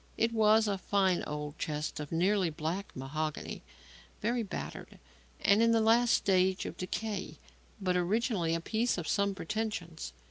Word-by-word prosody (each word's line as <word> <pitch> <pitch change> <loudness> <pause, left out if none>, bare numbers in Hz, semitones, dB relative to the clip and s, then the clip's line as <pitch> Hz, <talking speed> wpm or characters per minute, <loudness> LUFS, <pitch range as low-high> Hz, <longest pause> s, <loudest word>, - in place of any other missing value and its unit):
It 230 +1 +2
was 220 0 +5
a 200 -2 -1
fine 190 -2 +2
old 150 0 -5
chest 150 0 -3
of 150 -1 -6
nearly 185 +2 +2
black 165 +5 -3
mahogany, 155 +4 -4 0.6
very 235 +2 0
battered 200 - -6 0.4
and 200 +3 +4
in 230 0 +5
the 225 - +4
last 230 +2 +5
stage 190 -1 +2
of - - -5
decay, 185 -3 -4 0.4
but 185 -2 0
originally 180 -2 +1
a 165 - -2
piece 230 +6 0
of 175 - -4
some 200 -1 +1
pretensions. 190 -4 -4
190 Hz, 150 wpm, -31 LUFS, 165-220 Hz, 0.6 s, was